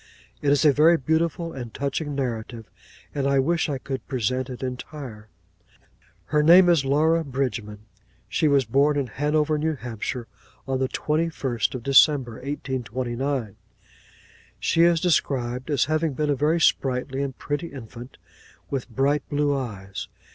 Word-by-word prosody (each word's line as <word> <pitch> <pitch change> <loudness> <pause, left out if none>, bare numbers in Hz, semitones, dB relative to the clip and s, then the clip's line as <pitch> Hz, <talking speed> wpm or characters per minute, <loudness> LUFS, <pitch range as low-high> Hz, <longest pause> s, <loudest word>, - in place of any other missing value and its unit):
It 145 - +1
is 145 +1 +3
a 145 - +6
very 160 +4 +5
beautiful 165 +3 -1
and 120 -4 -7
touching 145 +1 -2
narrative; 115 -4 -4 0.5
and 140 -1 -1
I 140 0 +2
wish 160 +5 +1
I 140 - -1
could 130 0 -6
present 130 +1 -1
it 125 0 -7
entire. 125 -3 -7 1.0
Her 150 0 +2
name 175 +4 +7
is 165 -5 +4
Laura 155 +4 +2
Bridgman. 120 -7 -4 0.4
'She 155 - +1
was 140 -3 +3
born 140 +6 +2
in 140 - 0
Hanover, 150 +4 0
New 160 +1 0
Hampshire, 120 -1 -5 0.4
on 135 -1 -1
the 130 - +1
twenty 155 +5 -1
first 125 -8 -2
of 125 - -6
December, 135 -3 +4
1829. 130 -3 -3 1.0
She 165 - +2
is 170 -1 +5
described 130 -7 0
as 140 -4 +2
having 155 0 0
been 150 +2 0
a - - +2
very 155 +5 +1
sprightly 135 -3 +1
and 135 -2 -4
pretty 145 +4 -3
infant, 125 -2 -10 0.5
with 135 -2 -3
bright 135 +4 +1
blue 145 0 +1
eyes. 100 -6 -5
140 Hz, 150 wpm, -24 LUFS, 125-150 Hz, 1.0 s, name